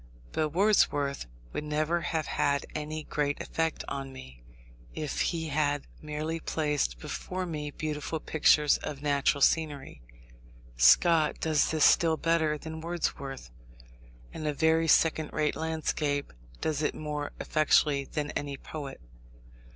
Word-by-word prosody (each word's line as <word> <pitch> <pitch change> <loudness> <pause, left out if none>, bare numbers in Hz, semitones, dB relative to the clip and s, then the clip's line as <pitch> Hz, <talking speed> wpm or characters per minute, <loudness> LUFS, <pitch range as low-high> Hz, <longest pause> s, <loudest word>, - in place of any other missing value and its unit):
But 155 -1 0
Wordsworth 145 - +2 0.3
would - - -3
never 155 +3 0
have 160 -2 -1
had 140 -1 0
any 155 0 -4
great 145 -1 -1
effect 160 -1 -2
on 135 -1 -5
me, 65 - -12 0.5
if 155 -2 -2
he 160 -2 -1
had 145 -1 0 0.2
merely 155 +2 -3
placed 150 - -1
before 185 - -4
me 150 -4 -4
beautiful 150 +1 -4
pictures 150 -1 +3
of 145 -1 -6
natural 140 -1 +2
scenery. 145 - +1 0.7
Scott 155 - +5
does 155 -2 +2
this 155 -2 +3
still 165 -2 +4
better 160 -2 +1
than 160 +1 -7
Wordsworth, 140 - -4 0.8
and 155 -1 -4
a 150 - -1
very 160 +1 +3
second 160 -1 +3
rate 150 -1 0
landscape 155 - -2 0.3
does 155 -2 -1
it 150 - 0
more 150 -1 -4
effectually 150 -2 +2
than 150 -1 -3
any 140 -1 -4
poet. 140 -1 -7
150 Hz, 130 wpm, -29 LUFS, 145-160 Hz, 0.8 s, Scott